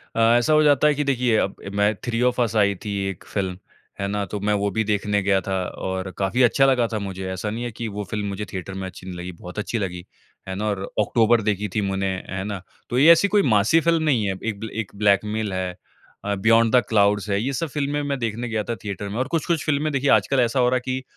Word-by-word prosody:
अ, - - -1
ऐसा 120 +5 +4
हो 155 0 +5
जाता 145 0 +4
है 150 - +3
कि 150 - 0
देखिए 120 -8 0
मैं 105 +1 +3
थ्री 120 -1 -1
ऑफ़ 125 0 +2
अस 115 -2 0
आई 100 -1 +3
थी 100 - -2
एक 95 - -8
फिल्म, 95 -3 -3 0.4
है 100 - -1
ना? 100 0 -2
तो 105 - -5
मैं 105 +1 0
वो 100 0 0
भी 110 +3 0
देखने 105 -1 0
गया 100 -1 +3
था 95 0 -2
और 95 0 -4
काफ़ी 100 +6 0
अच्छा 135 +3 +4
लगा 125 -3 +3
था 110 - -1
मुझे 95 -1 -5
ऐसा 95 +3 -3
नहीं 115 +3 -4
है 120 - -4
कि 115 +1 -5
वो 105 0 -5
फिल्म 105 -1 -2
मुझे 100 +1 -4
थिएटर 95 +1 -5
में 95 0 -5
अच्छी 90 0 -11
नहीं 90 - -6
लगी, 90 +1 -6
बहुत 90 +3 -9
अच्छी 110 +2 -2
लगी 90 -3 -4 0.4
है 95 - -4
ना? 105 - -3
और 100 -2 -2
ऑक्टोबर 115 +2 +3
देखी 105 0 -1
थी 105 - +2
मैंने 95 0 -1 0.2
है 95 +1 -3
ना? 100 -3 -5 0.3
तो 120 - -1
ये 160 +4 +8
ऐसी 170 +4 +5
कोई 205 0 +3
मासी 110 +11 +4
फिल्म 165 -1 +2
नहीं 130 -9 +2
है। 95 - -1
एक 110 -3 -3
बल 110 - -5
एक 95 - -21
ब्लैकमेल 105 +1 +1
है 95 -1 -3 0.5
अ, 100 0 0
बियॉन्ड 115 +3 +4
द 125 - +6
क्लाउड्स 100 -1 +2
है। 100 +1 +1
ये 135 +3 -2
सब 165 +5 -2
फिल्में 145 +1 -1
मैं 140 -1 -2
देखने 115 +1 -3
गया 110 -1 -1
था 115 - 0
थिएटर 100 -1 -5
में 105 - -5
और 130 - 0
कुछ-कुछ 165 0 -1
फिल्में 150 0 0
देखिए 140 +1 +1
आजकल 135 - +3
ऐसा 120 +1 +2
हो 125 -1 +4
रहा 130 - +1
है 125 - -4
कि 130 0 -2
105 Hz, 260 wpm, -23 LUFS, 100-125 Hz, 0.5 s, ये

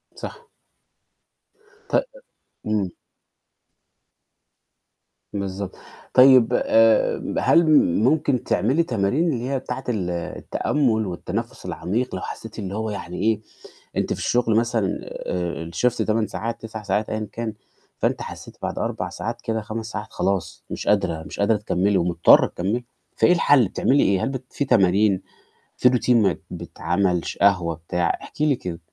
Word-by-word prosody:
صح. 470 -1 -9 1.4
ط - - 0 0.7
إمم. 100 -4 0 2.4
بالضبط، 100 -1 -4 0.4
طيب 130 -2 +7
آآ 115 0 +4 0.2
هل 170 0 +4 0.4
ممكن 135 -1 +2
تعملي 135 +10 +2
تمارين 120 +4 0
اللي 125 +2 -3
هي 135 -1 0
بتاعة 130 0 -5
ال 95 -7 -1
التأمل 110 - -1
والتنفُس 90 - -5
العميق 110 +9 -2
لو 95 - -4
حسّيتِ 115 0 -7
اللي 100 0 -4
هو 110 0 -2
يعني 90 -4 -6
إيه، 110 0 +1 0.6
أنتِ - - 0
في - - -6
الشغل 120 -3 +1
مثلًا 115 -4 0
آآ 85 -2 -4
الShift 125 +9 +1
8 110 0 +1
ساعات 115 +5 -4
9 110 -1 -7
ساعات 105 +2 -1
أيًا 110 -1 -3
كان، 115 -2 -4 0.5
فأنتِ - - 0
حسيتِ - - -9
بعد - - -3
4 - - -2
ساعات - - -5
كده 110 -1 -2
5 110 0 -5
ساعات 110 -1 -5
خلاص، 95 0 -2
مش - - -6
قادرة، 90 -6 +1
مش - - -9
قادرة 105 +1 +3
تكمّلي 100 -1 +1
ومضطرة 85 -1 +5
تكمّلي، 105 +7 -2 0.3
فإيه - - +5
الحل 145 - +4
بتعملي 140 +8 +2
إيه؟ 95 -1 +2
هل - - 0
بت 130 -1 -5
في 140 - -1
تمارين 100 -3 +3 0.6
في 125 - +5
Routine 125 0 -1
ما 105 -4 +3
بتعمل 90 -1 -1
ش - - -5
قهوة 90 -5 +3
بتاع؟ 85 +1 -1
احكي 150 - -3
لي 145 -3 +3
كده. 90 -6 -6
110 Hz, 145 wpm, -23 LUFS, 95-120 Hz, 2.4 s, طيب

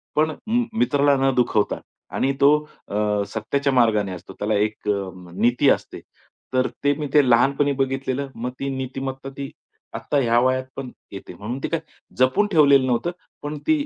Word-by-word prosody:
पण 155 +1 +2
म 240 +2 +2 0.2
मित्राला 145 -1 +3
न 135 - +3
दुखवता 115 -4 +1 0.4
आणि 135 - +1
तो 140 - +7 0.4
अ, 105 - -3 0.3
सत्याच्या 140 +6 -1
मार्गाने 110 -6 +3
असतो. 90 +1 -10
त्याला 105 +1 0
एक 105 +1 -1
अ, 100 -2 0 0.2
नीती 120 +7 +3
असते. - - 0 0.5
तर 130 0 +2 0.2
ते 145 0 +4
मी 150 - -2 0.2
लहानपणी 140 +4 +3
बघितलेलं. 135 +1 -1
मग 125 +2 -4
ती 140 - -2
नीतिमत्ता 135 +1 -5
ती 140 -1 -5 0.4
आत्ता 145 - -1
ह्या 120 -2 +3
वयात 130 +1 +2
पण 135 -2 -5 0.2
येते. 95 -2 -9
म्हणून 110 +9 -5
ते - - 0
काय 165 0 0 0.4
जपून 130 +11 +3
ठेवलेलं 140 -5 +5
नव्हतं. 125 +8 0 0.3
पण 150 +1 -4
ती 305 -2 +2
130 Hz, 165 wpm, -23 LUFS, 115-140 Hz, 0.5 s, तो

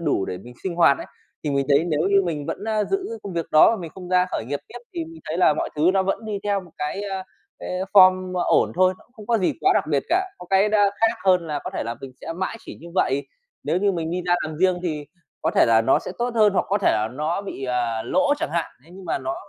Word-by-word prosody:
đủ 95 - +1
để 90 - -5
mình 120 +6 -13
sinh 185 -3 -3
hoạt 165 -5 +5
ấy, - - -7 0.4
thì 150 - 0
mình 140 -1 0
thấy 145 +2 +4
nếu 155 -4 0
như 200 0 +4
mình 150 -5 -3
vẫn, 205 - -4
a, 215 -1 0
giữ 390 - -1 0.2
công 200 - -6
việc 170 -2 -2
đó 155 - +7
và 230 - 0
mình 165 - -7
không 180 -2 -9
ra 180 0 +3
khởi - - -3
nghiệp 145 +1 -2
tiếp 245 - -9 0.2
thì 170 - -2
mình 160 0 -12
thấy 160 - -2
là 155 -4 +5
mọi - - -2
thứ 160 +4 +4
nó 190 -1 +2
vẫn 195 +4 -2
đi 210 -2 -3
theo 200 -1 0
một 180 - -15
cái, 150 +7 -3
ơ, 195 -1 -3
ờ, 190 - -5 0.4
cái - - -7 0.2
form 185 -2 +6
ổn 180 - +2
thôi, 185 +1 +3
nó - - -21
cũng 245 - -34
không 215 -4 -13
có 230 -1 +2
gì 185 - +1
quá - - +4
đặc - - +2
biệt 140 -2 +2
cả, 370 +3 +2
có 180 - -10
cái 195 +2 +4
nó 215 0 +2 0.2
khác 225 +1 +3
hơn 180 -3 +3
là 150 -2 -2
có - - -4
thể - - -3
là 115 +1 -3
mình 135 -1 -9
sẽ 165 - -5
mãi 190 +6 -3
chỉ - - -10
như 170 - -10
vậy. 140 -6 +1 0.4
Nếu - - 0
như 200 +1 +2
mình 165 -2 -3
đi 180 +1 -2
ra 175 - +4
làm 155 -1 -6
riêng 185 -1 +3
thì 155 -4 -3 0.4
có - - +1
thể - - +4
là 115 -1 +5
nó 125 - +4
sẽ - - -7
tốt 240 0 -1
hơn 215 -3 +4
hoặc - - +1
có 200 - +1
thể 200 - +3
là 110 0 0
nó 155 +8 -2
bị, 165 -9 -6
à, 120 -3 -1
lỗ 285 - +2
chẳng - - -2
hạn, 170 -1 -1
thế 165 - -19
nhưng 190 0 -11
mà - - -1
nó 130 0 -3
180 Hz, 295 wpm, -23 LUFS, 150-200 Hz, 0.4 s, đó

